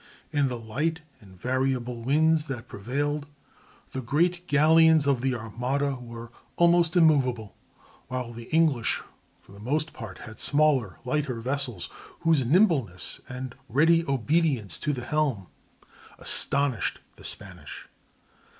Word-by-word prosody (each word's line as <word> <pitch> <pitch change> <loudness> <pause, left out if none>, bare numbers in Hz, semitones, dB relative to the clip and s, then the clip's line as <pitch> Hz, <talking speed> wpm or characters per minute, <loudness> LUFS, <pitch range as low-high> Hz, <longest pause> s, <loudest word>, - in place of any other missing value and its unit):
In 145 -2 +2
the 125 -2 -3
light 150 +9 -2 0.2
and 95 -5 -17
variable 125 -1 -1
winds 155 +5 +2
that 130 -5 -6
prevailed, 145 +7 -3 0.6
the 130 - -4
great 175 +8 0
galleons 160 +1 +5
of 140 -4 +2
the 130 -1 0
Armada 125 +5 -2
were 115 -2 -9 0.2
almost 170 0 +4
immovable, 130 - +3 0.5
while 125 -2 -4
the 115 0 -9
English 155 -7 +1 0.4
for - - -20
the 100 - -13
most 150 +8 -1
part 110 -6 -8
had 110 -1 -11
smaller, 145 - +3
lighter 130 -2 -1
vessels, 125 -5 -2 0.3
whose 165 -5 +3
nimbleness 140 - +2
and 130 -1 -6 0.2
ready 165 +7 +4
obedience 140 - 0
to 150 - -1
the 125 -4 -5
helm 140 -9 0 0.7
astonished 140 -5 +1 0.2
the - - -16
Spanish. - - -6
135 Hz, 125 wpm, -26 LUFS, 120-155 Hz, 0.7 s, galleons